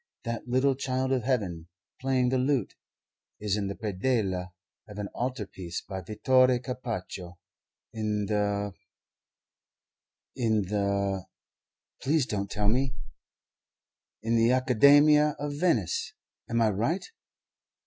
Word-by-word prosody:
That 115 +1 -4
little 130 +3 +3
child 130 0 -1
of 130 -2 +2
Heaven, 100 -10 -1 0.3
playing 130 -1 +1
the 130 0 +1
lute, 130 -4 +1 0.7
is 105 -2 0
in 100 -2 -1
the 100 - -4
predella 95 -3 -1 0.4
of 105 -1 -10
an 105 -1 -4
altar 125 -3 -3
piece 90 -3 -6
by 95 -1 -6
Vittore 130 +6 +3
Carpaccio 115 -8 -5 0.6
in 105 -2 -1
the 100 -1 0 1.6
in 110 -3 +1
the 100 -1 -1 0.7
please 150 0 +2
don't 100 -4 -3
tell 105 0 -1
me 130 +4 +1 1.3
in 115 +1 +1
the 115 +1 +4
Academia 145 +4 +5
of 145 0 -3
Venice. 145 - 0 0.4
Am 115 0 +1
I 110 - +3
right?" 120 - -1
115 Hz, 120 wpm, -28 LUFS, 100-130 Hz, 1.6 s, Academia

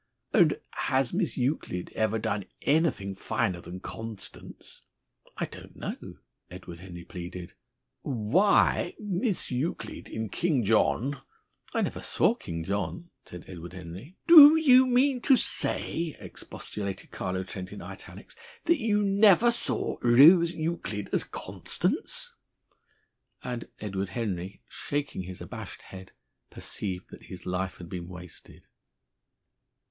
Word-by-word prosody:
"And - - +4
has 130 -1 0
Miss 180 -2 0
Euclid 125 - -2
ever 110 0 +1
done 100 -2 -2 0.2
anything 145 - +1
finer 95 -2 -1
than 90 +2 -9
Constance?" 110 -2 -9 0.6
"I - - -1
don't - - -12
know," - - -7 0.3
Edward 90 -2 -10
Henry 85 -1 -9
pleaded. 90 -1 -8 0.5
"Why 145 - +2
Miss 200 - -1
Euclid 130 +7 -3
in 110 -1 -4
'King 150 - +1
John' 115 +6 +2 0.3
" - - -27
"I - - +2
never - - -3
saw - - +2
'King 85 -1 -6
John,'" 100 - -3
said 90 -1 -10
Edward 85 -1 -9
Henry. 95 - -10
"Do 310 -2 +11
you 260 -5 +6
mean 255 +1 +3
to 265 0 +5
say," 165 -8 0
expostulated 100 -2 -6
Carlo 95 0 -3
Trent 95 -1 -7
in - - -8
italics, - - -10 0.3
"that 335 -2 +3
you 210 -3 +2
never 200 +3 +5
saw 235 - +1
Rose 160 +9 +7
Euclid 160 - -3
as - - +3
Constance?" - - -3 1.1
And 120 -2 -5
Edward 100 -2 -3
Henry, 95 -3 -4
shaking 145 -8 -3
his 90 0 -8
abashed - - -8
head, 95 0 -11 0.4
perceived 95 -3 -5
that - - -11
his 95 - -10
life 90 +1 -2
had 85 - -9
been 85 0 -6
wasted. 90 -1 -11
110 Hz, 125 wpm, -28 LUFS, -, 1.1 s, Do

